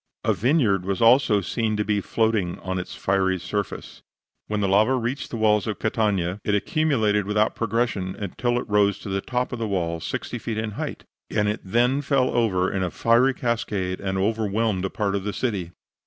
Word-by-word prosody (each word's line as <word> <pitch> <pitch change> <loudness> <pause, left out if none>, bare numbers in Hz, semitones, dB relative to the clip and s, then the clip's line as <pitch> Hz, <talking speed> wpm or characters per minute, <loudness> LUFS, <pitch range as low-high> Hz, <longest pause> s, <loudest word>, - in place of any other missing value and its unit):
A - - +2
vineyard 115 - +2
was 95 0 -2
also 115 -3 +5
seen 110 +4 -1
to 105 - 0
be 105 -1 +1
floating 110 -5 0
on 95 0 -2
its 90 - -7
fiery 95 -1 +1
surface. 100 +3 -5 0.5
When 105 0 -1
the 100 - +1
lava 105 +7 +4
reached 125 +3 -3
the 115 - -4
walls 105 -2 +2
of 110 - -2
Catania, 100 -4 0
it 105 - +1
accumulated 110 -5 +1
without 105 +1 +2
progression 115 -5 -1
until 120 +5 -2
it 125 - -3
rose 105 -1 +3
to - - -8
the 95 0 -1
top 125 +3 -2
of 120 - -4
the 115 - -1
wall, 85 -4 -1
60 - - -4
feet 115 -2 -4
in 110 -1 -2
height, 105 - -5 0.3
and 105 - +1
it 105 +2 -1
then 120 +8 +2
fell 140 -3 +1
over 95 -6 +1
in 95 - -1
a 90 - 0
fiery 120 +7 +3
cascade 105 -7 -2
and 95 -1 -2
overwhelmed 105 -1 0
a - - -1
part 100 0 -1
of 100 -1 -1
the 105 0 -3
city. 100 -9 -2
105 Hz, 200 wpm, -24 LUFS, 95-115 Hz, 0.5 s, also